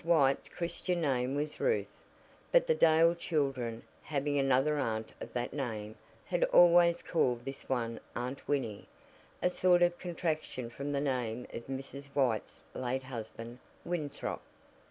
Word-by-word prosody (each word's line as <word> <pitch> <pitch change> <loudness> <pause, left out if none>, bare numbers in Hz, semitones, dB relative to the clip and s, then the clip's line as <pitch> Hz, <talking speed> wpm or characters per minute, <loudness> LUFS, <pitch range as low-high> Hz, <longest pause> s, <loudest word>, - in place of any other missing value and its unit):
White's 150 -5 +3
Christian 175 +1 -2
name 130 -3 +1
was 150 +1 -3
Ruth, 480 -1 0 0.5
but - - +5
the 485 - +3
Dale 165 - +5
children, 135 -9 -1 0.2
having 145 -1 -1
another 135 +2 +3
aunt 110 -4 -2
of - - -6
that 120 0 -2
name, 110 -6 -3 0.3
had - - 0
always 175 - +6
called 125 -8 +1
this 135 0 -7
one 115 -3 -1 0.2
Aunt 125 +3 -4
Winnie, 130 -8 -1 0.6
a 180 - +3
sort 180 -1 +4
of 175 0 +2
contraction 155 -8 -3
from 140 +4 -4
the 140 -1 0
name 125 -4 -1
of 115 - -7
Mrs. 135 +1 -6
White's 125 -6 0
late 130 +1 -2
husband 115 -1 -7 0.3
Winthrop. 155 -5 -3
140 Hz, 140 wpm, -32 LUFS, 125-165 Hz, 0.6 s, always